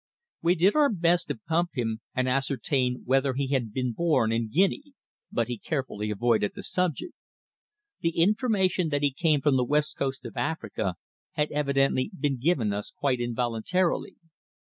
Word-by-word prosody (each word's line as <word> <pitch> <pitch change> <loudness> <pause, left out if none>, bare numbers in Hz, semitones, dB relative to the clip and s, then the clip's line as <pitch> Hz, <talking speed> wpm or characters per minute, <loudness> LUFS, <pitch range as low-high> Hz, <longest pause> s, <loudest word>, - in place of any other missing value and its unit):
We 170 +2 +3
did 185 +4 +4
our 295 -2 +5
best 175 -2 +2
to - - -2
pump 175 -3 -1
him 115 -3 -2
and 130 0 +1
ascertain 130 -1 0
whether 135 +1 +2
he 135 0 -1
had 125 -6 0
been 125 +1 -2
born 150 -7 +2
in 115 -1 -1
Guinea, 195 - +1 0.4
but 115 -2 0
he 120 -3 -4
carefully 130 -8 -3
avoided 105 0 +1
the - - -7
subject. 180 - -1 0.9
The 165 0 -1
information 190 -2 +2
that 145 -1 -1
he 145 - +3
came 155 -1 +2
from 140 -1 +3
the 125 - +2
West 150 +4 +1
Coast 135 -1 -3
of 115 - -8
Africa 110 - -2 0.4
had 150 0 0
evidently 140 -2 +1
been 140 -3 0
given 125 -8 +1
us 105 0 -4
quite 135 -3 -1
involuntarily. 120 +9 -1
140 Hz, 165 wpm, -27 LUFS, 120-170 Hz, 0.9 s, our